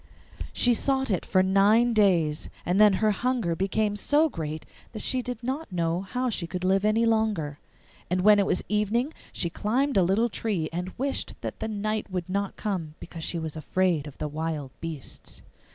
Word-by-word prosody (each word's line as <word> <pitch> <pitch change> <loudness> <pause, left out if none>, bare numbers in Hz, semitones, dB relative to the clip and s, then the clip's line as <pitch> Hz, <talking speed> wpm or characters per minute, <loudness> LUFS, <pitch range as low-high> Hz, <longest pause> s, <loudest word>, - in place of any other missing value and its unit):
She 245 - +3
sought 265 0 +1
it 185 - 0
for 185 -2 +4
nine 205 +5 +4
days, 170 -8 +2 0.2
and 185 +4 +3
then 210 -2 +7
her 215 +2 +2
hunger 230 -5 0
became 205 +3 0
so 295 +9 +3
great 155 - -5 0.3
that 215 - -5
she 255 - +1
did 245 -1 -6
not 265 +2 -3
know 170 0 0
how 250 +6 -2
she 185 -8 -2
could 180 +1 -5
live 190 +1 +2
any 215 +2 +3
longer. 215 -10 0 0.5
And 180 +1 +1
when 210 +1 +6
it 200 - +2
was - - 0
evening 215 +8 0 0.2
she 170 - -2
climbed 255 - 0
a - - +6
little 195 +7 +2
tree 195 -6 -2
and 180 +2 -3
wished 275 +2 -2
that - - -5
the - - -2
night 215 0 -2
would 180 -2 -3
not 200 +1 -2
come, 175 -7 -3
because 165 -1 -8
she 170 - -2
was 160 -2 -4
afraid 160 0 0
of 145 - -11
the 150 - -3
wild 150 -2 -3
beasts. 160 -5 -7
195 Hz, 190 wpm, -27 LUFS, 170-220 Hz, 0.5 s, then